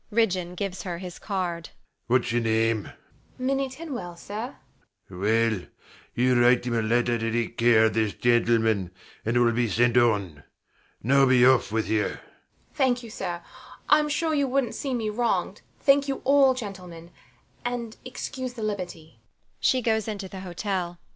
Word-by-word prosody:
[Ridgeon 185 -5 0
gives 195 0 -4
her 175 -3 -4
his 180 -1 -8
card]. 175 -5 -3 0.4
Whats 125 0 +2
your 120 0 +1
name? 115 -1 +1
THE - - -10
MAID. - - -17 0.5
Minnie 270 0 0
Tinwell, 260 - -7
sir. 215 +8 -6 0.5
SIR 95 - -12
PATRICK. - - -8
Well, 110 -2 +1 0.6
you 125 -1 +4
write 120 0 +4
him 120 - -1
a 115 - +1
letter 120 +1 +1
to 115 +1 0
care 115 -1 +4
of 110 - +1
this 110 -2 0
gentleman; 115 -5 +2 0.3
and 115 +2 0
it - - +5
will 120 -1 +4
be 115 0 0
sent 120 +4 +2
on. 100 -11 +2 0.6
Now 135 +3 +4
be 125 -1 +5
off 130 -5 +4
with 110 0 0
you. 110 -1 +1
THE - - -1
MAID. - - -9 0.5
Thank 255 -4 +1
you, 230 - -9
sir. 175 -4 -5 0.5
I'm 300 0 +4
sure 315 +2 0
you 285 -2 +2
wouldnt 265 -2 0
see 270 -3 -3
me 220 -3 -2
wronged. 235 +2 -1 0.2
Thank 280 0 +4
you 270 -1 -3
all, 275 -1 +5
gentlemen; 180 -7 -8 0.5
and 240 -2 -4
excuse 255 0 -5
the 230 -3 -6
liberty. 175 - -5
170 Hz, 160 wpm, -26 LUFS, -, 0.6 s, it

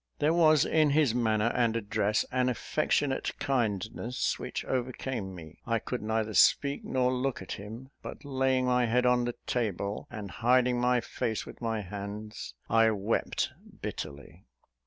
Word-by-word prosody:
There 155 +2 +2
was 155 -3 +5
in 155 -2 +3
his 140 -4 +3
manner 115 -1 +2
and 115 -2 +2
address 105 -1 0
an 125 0 +2
affectionate 140 +2 0
kindness 115 -1 -1
which - - -4
overcame 125 -5 -3
me. 80 -2 -11
I 115 -1 +2
could 125 +3 -4
neither 110 0 -1
speak 140 +8 +4
nor 125 -1 +1
look 130 +1 -1
at - - -10
him; 115 +7 -7
but, - - -8
laying 130 -2 +1
my 125 -1 +3
head 125 +2 +2
on 125 -1 +3
the 120 - -3
table, 105 -4 -2
and 105 -5 -7
hiding 125 +4 +3
my 125 0 +3
face 110 -1 -3
with - - -11
my 115 -2 -1
hands, 100 -4 -7
I 115 0 +5
wept 110 +4 -1 0.3
bitterly. 75 - -7
120 Hz, 155 wpm, -29 LUFS, 105-130 Hz, 0.3 s, was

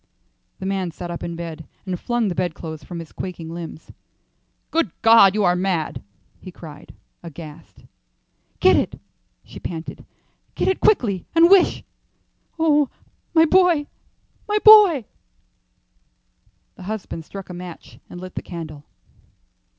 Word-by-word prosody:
The 190 - -7
man 190 -2 -1
sat 175 +2 -7
up 170 - -6
in 170 0 -5
bed 165 -3 -7 0.2
and 185 -2 -4
flung 240 -2 -1
the 185 - -1
bedclothes 160 -2 -4
from 175 - -8
his 165 -2 -8
quaking 170 -3 -7
limbs. 165 -2 -9 0.8
"Good 325 - +1
God, 225 -4 +7
you 210 - +1
are 180 -1 +3
mad!" 180 -4 -2 0.4
he 185 - -10
cried, 155 -4 -12 0.3
aghast. 160 -2 -12 0.7
"Get - - +5
it," - - -1 0.4
she - - -12
panted; 165 -1 -7 0.5
"get - - -1
it 380 - +1
quickly, 210 - +2
and 335 +2 +6
wish 390 -3 +5 0.7
Oh, 300 -4 +3 0.5
my 325 0 +7
boy, 350 -3 +4 0.6
my 420 - +2
boy!" 405 - +8 1.7
Her - - -11
husband 205 -5 -5
struck 195 +3 -9
a - - -7
match 175 -1 -10
and 175 - -9
lit 185 0 -9
the - - -5
candle. 155 -4 -8
185 Hz, 135 wpm, -22 LUFS, 170-240 Hz, 1.7 s, boy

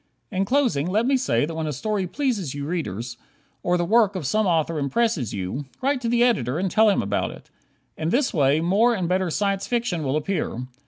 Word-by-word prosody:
In 190 -1 0
closing, 235 - +1
let 210 +5 +1
me 270 +2 +3
say 260 - +1
that 165 - -6
when 160 -1 -3
a - - -1
story 200 - -2
pleases 205 - -2
you 140 0 -4
readers, 120 - -4 0.4
or 180 0 +1
the 175 - 0
work 210 0 +3
of 180 -6 -4
some 215 - +1
author 165 -2 +1
impresses 145 - 0
you, 100 +9 -4
write 270 0 0
to 235 - -1
the 240 0 +3
editor 150 - +1
and 185 +1 -1
tell 220 0 +5
him 200 - +2
about 100 0 -1
it. - - -13 0.5
In 160 0 -1
this 250 +7 +1
way 145 0 +3
more 210 +8 +3
and 185 -5 -2
better 185 0 +1
Science 195 +3 -1
Fiction 235 -9 -1
will 135 0 -1
appear. 155 -6 -2
185 Hz, 215 wpm, -24 LUFS, 150-225 Hz, 0.5 s, tell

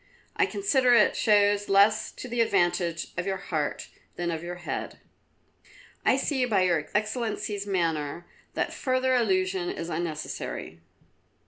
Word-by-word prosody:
I - - +3
consider 265 -11 +3
it 210 - +4
shows 205 -1 +3
less 210 +2 +4
to - - -8
the 240 -1 0
advantage 175 -5 +1
of 180 +1 -2
your 190 -1 -1
heart 155 -6 -3 0.3
than 175 -1 -2
of 160 -1 -3
your 175 +1 -5
head." 175 - -5 1.1
"I 255 - +4
see 270 -1 0
by 205 -6 +2
Your 170 -4 +1
Excellency's 210 -2 -2
manner 165 -4 -1 0.3
that - - -1
further 260 0 +1
allusion 185 -5 +1
is 170 - -5
unnecessary." 155 - -4
195 Hz, 135 wpm, -27 LUFS, 175-220 Hz, 1.1 s, it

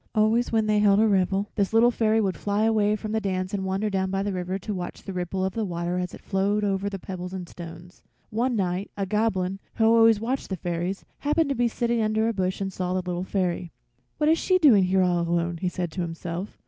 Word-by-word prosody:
Always 220 +3 +2
when 220 -1 +2
they 215 -1 +2
held 205 -1 +5
a 220 - +5
revel 195 0 +1
this 200 0 0
Little 235 +2 +5
Fairy 225 -1 +2
would 195 -4 0
fly 205 +1 -1
away 215 -2 +3
from 215 0 -5
the 220 0 0
dance 185 0 -2
and 195 -1 -1
wander 190 +3 -1
down 190 -2 0
by 195 +1 -1
the 200 -1 -2
river 180 +1 -2
to 210 +2 -5
watch 180 -2 -6
the 195 - -6
ripple 180 +1 -2
of 190 - -2
the 225 - -1
water 175 -1 -2
as 180 -1 -3
it - - -15
flowed 200 +2 0
over 200 0 0
the 195 - -5
pebbles 180 0 -7
and 180 -2 -5
stones. 170 +1 -11 0.3
One 240 +3 0
night 185 -1 -1
a 200 - -1
Goblin, 195 -2 0 0.2
who 225 - +2
always 225 -1 +6
watched 250 +5 -2
the 190 - -1
fairies, 175 +3 -3
happened 300 +1 +1
to 275 - 0
be 240 0 +2
sitting 235 0 0
under 220 +1 +1
a 230 - 0
bush 185 -2 -1
and 195 -1 -3
saw 180 0 -2
the 185 -1 -2
Little 180 0 -2
Fairy. 180 -3 -2 0.5
"What 300 - +1
is 320 +1 +4
she 370 - +3
doing 250 - +6
here 190 +1 +3
all 175 -1 +2
alone?" 170 0 0
he 180 +2 -1
said 180 -2 -3
to 180 - -3
himself. 170 +3 -5
195 Hz, 245 wpm, -25 LUFS, 180-220 Hz, 0.5 s, always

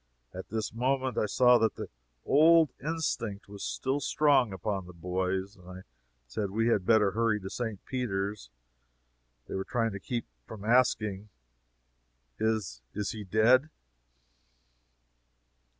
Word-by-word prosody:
At 95 0 -8
this 110 0 -3
moment 130 +2 0
I 105 - +1
saw 125 +3 +5
that 110 -1 +1
the - - -6 0.4
old 160 +2 +5
instinct 150 -10 -3
was 100 0 -9
strong 135 -2 +1
upon 95 0 -3
the 90 - -11
boys, 95 +3 -2
and 90 -3 -16
I 90 0 -9 0.4
said 80 - -3
we 115 +4 +1
had 100 -5 +1
better 110 -3 +4
hurry 115 0 +1
to 95 -1 -8
St. 110 -5 -4
Peter's. 105 - -3 1.0
They - - -7
were 95 - -2
trying 115 +1 -1
to 100 - -6
keep 120 +4 -4 0.2
from 105 -2 -9
asking, 110 -4 +2 1.1
"Is 110 - -1
is 105 -1 -2
he 110 -2 -6
dead?" 115 +9 +4
110 Hz, 135 wpm, -29 LUFS, 95-125 Hz, 1.1 s, saw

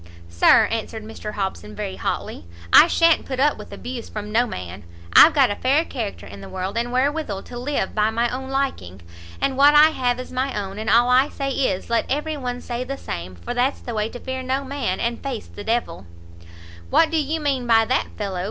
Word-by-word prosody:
"Sir," 85 0 +5
answered 225 -1 -4
Mr 215 -1 -7
Hobson, 190 - -4
very 95 -1 -5
hotly, 85 - -4 0.3
"I 320 - +9
sha'n't 335 -1 +3
put 260 -1 -4
up 295 +2 +2
with - - -10
abuse 245 -1 -7
from 210 -1 -6
no 240 +3 +2
man! 90 - -7 0.3
I've 320 - +8
got 270 -6 +4
a - - -2
fair 280 +8 +2
character 225 -10 -5
in 100 0 -11
the - - -10
world, 190 +2 -4
and 235 +1 -1
wherewithal 260 -5 -1
to 240 - -8
live 265 -6 -2
by 215 0 +2
my 230 +2 0
own 265 +2 -5
liking. 95 - -3 0.4
And 270 - 0
what 290 +2 +6
I 300 +1 +8
have 250 -4 -1
is 255 - -8
my 260 -2 -2
own, 195 0 -6
and 220 0 -3
all 235 +3 +5
I 260 +3 +4
say 275 -1 -3
is, 235 -7 -1
let 230 - +1
every 300 +3 -1
one 250 -3 -4
say 240 0 -4
the 275 +2 -5
same, 90 - -6
for 85 - -6
that's 250 +3 0
the 240 - -6
way 215 0 -1
to 245 - -9
fear 260 +1 -5
no 260 +2 -2
man, 270 -8 -3
and 235 0 -2
face 265 -5 -5
the 205 - -10
d 225 - +1
l." 95 - -4 0.8
"What 325 -1 +3
do 325 - +1
you 310 +3 -2
mean 275 -5 -1
by 225 -1 +5
that, 255 +3 0
fellow?" 195 -4 -3
245 Hz, 225 wpm, -22 LUFS, 210-275 Hz, 0.8 s, I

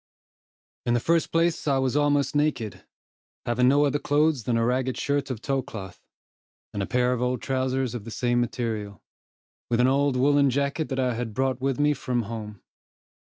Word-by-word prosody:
In 120 - +3
the - - +3
first 165 +6 +1
place 165 -1 +1
I 140 -2 +3
was 130 0 0
almost 145 -1 +2
naked, 145 -9 -1 0.6
having 125 +1 +2
no 145 +3 +4
other 145 +1 0
clothes 145 -5 +1
than 120 -1 +1
a 115 - +2
ragged 130 +1 0
shirt 140 -1 -1
of 115 -4 -5
tow 135 -2 0
cloth, 100 -9 -9 0.7
and 100 - -2
a 95 - -2
pair 125 0 +2
of 125 - -3
old 125 -1 -1
trowsers 130 -1 -1
of 120 -4 -5
the 115 - -8
same 120 +1 0
material, 110 -4 -3 0.7
with 120 -1 +1
an 125 - +5
old 135 0 +2
woollen 140 +1 +4
jacket 140 +4 -1
that 135 -1 -2
I 125 -1 +1
had 115 -2 -4
brought 130 0 0
with 135 -1 -1
me 150 0 +3
from 125 -3 -2
home. 105 -2 -7
130 Hz, 190 wpm, -25 LUFS, 120-140 Hz, 0.7 s, an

